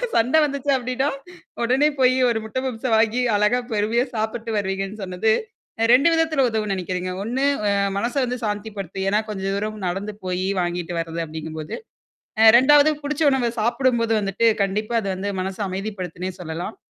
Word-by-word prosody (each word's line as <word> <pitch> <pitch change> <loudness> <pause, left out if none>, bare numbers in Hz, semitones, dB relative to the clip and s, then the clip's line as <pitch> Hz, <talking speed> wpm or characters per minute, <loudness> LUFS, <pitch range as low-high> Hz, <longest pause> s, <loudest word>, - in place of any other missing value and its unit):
சண்டை 255 +7 +4
வந்துச்சு 280 0 -2
அப்டின்னா, 255 +3 -1 0.6
உடனே 270 +5 +3
போய் 255 0 +4
ஒரு 225 -2 0
முட்டை 255 +4 -3
பப்ஸ 235 0 -6
வாங்கி 225 +3 +2 0.2
அழகா 210 +4 +2
பொறுமையா 220 +4 +1
சாப்பிட்டு 220 +1 -3
வருவீங்கன்னு 195 +1 -3
சொன்னது. 185 +4 0 0.5
அ - - +4
2 275 +6 +6
விதத்தில 315 -5 +2
உதவும்ன்னு 215 -3 -1
நெனைக்கிறேங்க. 185 0 -3
ஒண்ணுஅ 260 +5 0 0.5
மனச 240 +5 -2
வந்து 250 0 -4
சாந்திப்படுத்தும். 205 -3 -4
ஏன்னா 210 +2 +2
கொஞ்ச 190 -2 -5
தூரம் 215 0 -4
நடந்து 200 +3 -4
போயி 185 +1 -1
வாங்கிட்டு 175 0 -3
வர்றது 165 0 -3
அப்படிங்கும்போது. 155 0 -6 0.7
அ - - +7
2 290 +3 +6
புடிச்ச 300 +2 -1
உணவ 245 -3 +1
சாப்பிடும்போது 235 -1 +1
வந்துட்டு, 200 +3 0 0.2
கண்டிப்பா 215 +4 -2
அது 195 - -3
வந்து 200 +2 -3
மனச 190 0 -4
அமைதிப்படுத்தத்துன்னே 185 -2 -5
சொல்லலாம். 170 +5 -5
215 Hz, 155 wpm, -22 LUFS, 190-250 Hz, 0.7 s, அ